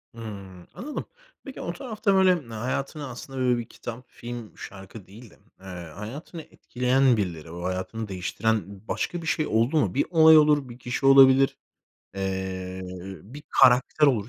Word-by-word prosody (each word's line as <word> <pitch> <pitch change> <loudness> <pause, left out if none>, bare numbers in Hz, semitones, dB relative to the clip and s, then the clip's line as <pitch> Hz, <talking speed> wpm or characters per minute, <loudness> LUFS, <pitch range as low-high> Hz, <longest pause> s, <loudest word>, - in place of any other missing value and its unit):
Hımm, 100 -5 -9
anladım. 290 +4 -6 0.4
Peki 270 - -9
o 170 - -4
tarafta 215 0 -1
böyle 190 -1 +5 0.2
hayatını 135 +6 -3
aslında 130 +2 -8
böyle 125 -1 +2
bir 120 - -4
kitap, 120 +2 -8
film, 120 -2 -9
şarkı 95 +1 -10
değil 110 +4 -13
de, - - -20 0.2
eee, 95 - -16 0.3
hayatını 140 - -8
etkileyen 125 -3 +1
birileri, 85 -5 -4
o 85 0 -7
hayatını 95 +5 -3
değiştiren 105 +3 -1 0.2
başka 175 - -2
bir 160 - -7
şey 155 0 0
oldu 115 +8 +1
mu? 105 -12 +1
Bir 140 - +1
olay 160 -2 +7
olur, 150 -3 +4
bir 120 +1 -11
kişi 125 +3 -3
olabilir, 135 0 +6 0.6
eee, 95 -1 -4 0.4
bir 140 +8 -11
karakter 130 +4 +5
olur. 115 -6 +1
120 Hz, 155 wpm, -25 LUFS, 100-145 Hz, 0.6 s, olay